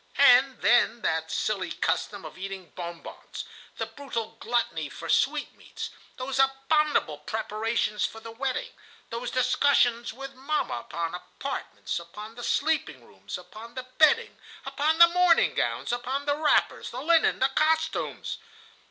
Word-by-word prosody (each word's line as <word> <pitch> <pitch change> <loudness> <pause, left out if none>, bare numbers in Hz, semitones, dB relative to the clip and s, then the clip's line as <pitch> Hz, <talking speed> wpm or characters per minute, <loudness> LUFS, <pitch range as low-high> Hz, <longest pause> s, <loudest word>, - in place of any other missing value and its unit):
"And 265 -1 +6
then 235 +2 +4
that 160 0 0
silly 200 +1 -1
custom - - -1
of - - -9
eating 190 -1 -7
bon 170 -1 -7
bons, - - -8 0.3
that - - -5
brutal 235 -6 -4
gluttony 240 +1 -1
for - - -8
sweetmeats, - - -1 0.3
those 265 +1 -3
abominable 270 - +2
preparations 215 +4 -1
for 225 - -2
the 225 0 -9
wedding, 275 - -3 0.4
those 235 +1 -3
discussions 250 -2 +3
with 270 +3 -8
mamma 275 +4 -1 0.2
upon 170 -1 -2
the 180 - -4
apartments, 275 -7 -5
upon 210 +6 -10
the 240 +1 -9
sleeping 275 - 0
rooms, 95 +1 -8
upon 215 +7 -12
the 255 - -4 0.2
bedding, 460 +10 +5 0.3
upon 290 +4 +1
the 340 0 +10
morning 355 -1 +4
gowns, - - -1
upon 260 +4 -2
the 285 0 +2
wrappers, 305 0 +2
the 250 - -6
linen, 330 +1 +4
the 265 - +3
costumes! 320 +3 0
250 Hz, 145 wpm, -27 LUFS, 215-285 Hz, 0.4 s, the